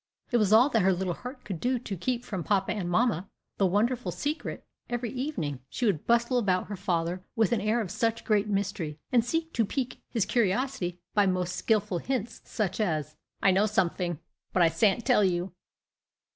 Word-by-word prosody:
It 240 Hz, -, +4 dB
was 210 Hz, -3 st, +2 dB
all 230 Hz, +5 st, +7 dB
that 225 Hz, -6 st, +2 dB
her 190 Hz, +1 st, +4 dB
little 180 Hz, 0 st, -1 dB
heart 255 Hz, -, -9 dB
could 190 Hz, -5 st, -4 dB
do 250 Hz, +5 st, +1 dB
to 220 Hz, -4 st, -5 dB
keep 240 Hz, +7 st, -2 dB
from 190 Hz, -7 st, -4 dB
papa 195 Hz, 0 st, +1 dB
and 185 Hz, -5 st, -2 dB
mamma 200 Hz, -1 st, +1 dB, 0.3 s
the 195 Hz, -, +4 dB
wonderful 235 Hz, +6 st, +1 dB
secret. 300 Hz, +2 st, -4 dB, 0.2 s
Every 240 Hz, -1 st, -2 dB
evening 250 Hz, -, -3 dB
she 250 Hz, -, -2 dB
would 190 Hz, -9 st, 0 dB
bustle 235 Hz, +2 st, +3 dB
about 185 Hz, -4 st, 0 dB
her 205 Hz, -, -3 dB
father 180 Hz, -2 st, -1 dB
with 225 Hz, -3 st, +2 dB
an 230 Hz, -4 st, +2 dB
air 215 Hz, +3 st, +1 dB
of 190 Hz, -6 st, -4 dB
such 225 Hz, +2 st, -1 dB
great 210 Hz, -1 st, +2 dB
mystery, 195 Hz, -7 st, -2 dB
and 240 Hz, -3 st, +4 dB
seek 325 Hz, +6 st, -2 dB
to 230 Hz, -, +2 dB
pique 255 Hz, +4 st, -3 dB
his 225 Hz, -5 st, 0 dB
curiosity 210 Hz, -4 st, 0 dB
by 205 Hz, -2 st, +4 dB
most 180 Hz, -1 st, 0 dB
skilful 205 Hz, -5 st, +1 dB
hints, 240 Hz, -2 st, -3 dB
such 205 Hz, -4 st, -2 dB
as, 155 Hz, -7 st, -1 dB, 0.3 s
"I 195 Hz, -, +6 dB
know 195 Hz, +3 st, +3 dB
somefing! 180 Hz, -5 st, 0 dB, 0.4 s
but 180 Hz, -, +4 dB
I 165 Hz, -, +6 dB
s'ant 200 Hz, +7 st, +2 dB
tell 250 Hz, -5 st, +4 dB
you." 180 Hz, -1 st, 0 dB
210 Hz, 195 wpm, -28 LUFS, 180-240 Hz, 0.4 s, all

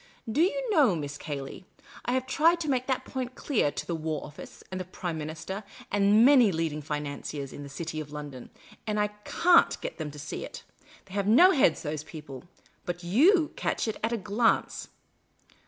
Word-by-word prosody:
*' 225 Hz, -, -8 dB
Do -, -, +5 dB
you -, -, +1 dB
know, 280 Hz, -, +4 dB
Miss 145 Hz, -2 st, -4 dB
Cayley, 145 Hz, +3 st, -6 dB, 0.4 s
I 245 Hz, -, 0 dB
have 260 Hz, 0 st, 0 dB
tried 325 Hz, +6 st, +3 dB
to 315 Hz, -, -3 dB
make 255 Hz, -3 st, 0 dB
that 260 Hz, -2 st, -1 dB
point 255 Hz, -1 st, -5 dB
clear 235 Hz, -, +1 dB
to -, -, -5 dB
the 170 Hz, -, -3 dB
War 160 Hz, -1 st, -3 dB
Office, 150 Hz, -, -11 dB
and 185 Hz, 0 st, -3 dB
the -, -, -6 dB
Prime 175 Hz, -1 st, -5 dB
Minister, 165 Hz, +7 st, -5 dB, 0.3 s
and 205 Hz, +3 st, +5 dB
many 255 Hz, -6 st, +6 dB
leading 160 Hz, -3 st, -2 dB
financiers 145 Hz, -1 st, -5 dB
in -, -, -8 dB
the 140 Hz, -, -8 dB
Cit}' 160 Hz, +4 st, -5 dB
of 150 Hz, -1 st, -9 dB
London, 145 Hz, -4 st, -8 dB, 0.4 s
and 210 Hz, 0 st, 0 dB
I 210 Hz, 0 st, +2 dB, 0.2 s
caji't 350 Hz, 0 st, +4 dB
get -, -, -6 dB
them 155 Hz, -2 st, -3 dB
to 150 Hz, -, -11 dB
see 145 Hz, +1 st, -5 dB
it. -, -, -8 dB, 0.4 s
They 190 Hz, -, -14 dB
have 200 Hz, 0 st, -1 dB
no 340 Hz, -, +7 dB
heads, 275 Hz, -, +3 dB
those 150 Hz, -1 st, -3 dB
people. 150 Hz, -4 st, -10 dB, 0.4 s
But 175 Hz, -1 st, -3 dB
jj'^?< 300 Hz, -, +4 dB
catch -, -, -1 dB
at 220 Hz, -, 0 dB
it -, -, -22 dB
at 225 Hz, -, +1 dB
a 235 Hz, -, 0 dB
glance. 210 Hz, +3 st, 0 dB
190 Hz, 205 wpm, -28 LUFS, -, 0.4 s, no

